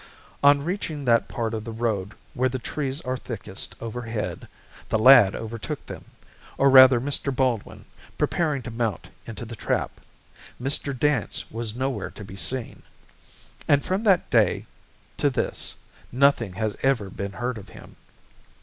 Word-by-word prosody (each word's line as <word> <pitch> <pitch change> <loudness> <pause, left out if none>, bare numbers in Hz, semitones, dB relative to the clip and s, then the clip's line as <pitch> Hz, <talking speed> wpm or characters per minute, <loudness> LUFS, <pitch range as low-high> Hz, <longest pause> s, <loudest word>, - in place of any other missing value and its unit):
On 140 0 +6
reaching 160 -5 -3
that 115 -2 +3
part 115 -1 -3
of 110 -1 -3
the 115 - -6
road 110 -3 -2 0.2
where 130 +1 +1
the 130 - -3
trees 135 +2 -3
are 130 0 -2
thickest 110 -6 -6
overhead, 115 -6 -5 0.4
the - - +2
lad 110 -4 +7
overtook 115 -1 -5
them, - - -9 0.5
or 135 0 +4
rather 130 -2 +9
Mr. 140 +2 0
Baldwin, 125 -5 -1 0.3
preparing 150 -6 0
to 120 - -6
mount 115 -4 -3 0.2
into 115 +1 -7
the 115 +1 -8
trap. - - -2 0.6
Mr. 135 +1 +1
Dance 145 -4 0
was 115 -1 -4
nowhere 130 +1 -2
to 105 - -11
be 95 - -10
seen. 125 +5 -4 0.9
And 145 -1 +3
from 190 +3 0
that 190 -4 +4
day 110 -6 +3 0.5
to - - +2
this - - -2 0.4
nothing 125 -6 +3
has 105 +2 -2
ever 120 -8 +1
been 100 +1 -5
heard 120 +1 -3
of 100 - -13
him. - - -14
120 Hz, 150 wpm, -25 LUFS, 110-135 Hz, 0.9 s, rather